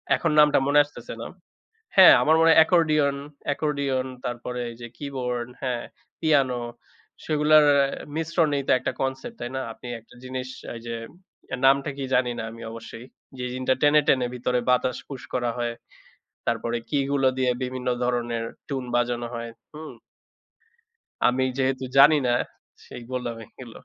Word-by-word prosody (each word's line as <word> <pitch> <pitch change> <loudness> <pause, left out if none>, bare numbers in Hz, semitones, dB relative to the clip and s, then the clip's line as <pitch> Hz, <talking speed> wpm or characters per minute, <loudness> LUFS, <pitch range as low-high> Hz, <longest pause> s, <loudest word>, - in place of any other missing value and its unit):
এখন 165 - 0
নামটা 150 -1 +6
মনে 145 +1 +5
আসতেছে 145 - -10
না। - - -5 0.7
হ্যাঁ, 190 -2 +10
আমার 155 +1 +4
মনে 165 - +6
হয় 160 - +7
accordion, 155 -5 +3 0.4
accordion, 140 -3 -1 0.2
তারপরে 125 +1 -4
এই - - -11
যে 120 - -6
keyboard, 125 -4 -3
হ্যাঁ, 125 -3 -2 0.4
piano 135 -6 +2 0.6
সেগুলার 155 0 +5
অ্যা 140 -1 +4 0.3
মিশ্রণেই 160 -3 0
তো - - +3
একটা 130 - -2
concept, 135 - -3
তাই 120 - -3
না? 130 - -1
আপনি 120 - -12
একটা 115 - -20
জিনিস 130 0 -5 0.3
এই 115 - -8
যে, 115 - -3 0.6
এর - - -2
নামটা 140 +2 +4
কি 140 - -4
জানি 125 -1 +2
না - - -3
আমি 115 0 -11
অবশ্যই, 115 +1 -9 0.3
যে 125 - -4
জিনটা 130 +1 +1
টেনে, 150 +1 +5
টেনে, 130 -2 +3
ভিতরে 125 0 0
বাতাস 125 0 +2
push 135 -3 -7
করা 120 -1 0
হয়। 120 -1 -2 0.8
তারপরে 115 0 -1
key 145 -2 +1
গুলো 135 -2 +3
দিয়ে 130 -1 +2
বিভিন্ন 125 0 -4 0.2
ধরনের 120 -2 -1 0.2
tune 135 -3 -3
বাজানো 120 0 0
হয়। 115 0 -5 0.2
হুম? 155 +1 -8 1.4
আমি 125 +1 +2
যেহেতু 130 -1 0
জানি 150 +3 +8
না 120 - +3 0.5
সেই 120 - -10
বললাম 125 -2 -3
এইগুলো 120 -1 -13
130 Hz, 160 wpm, -25 LUFS, 120-145 Hz, 1.4 s, হ্যাঁ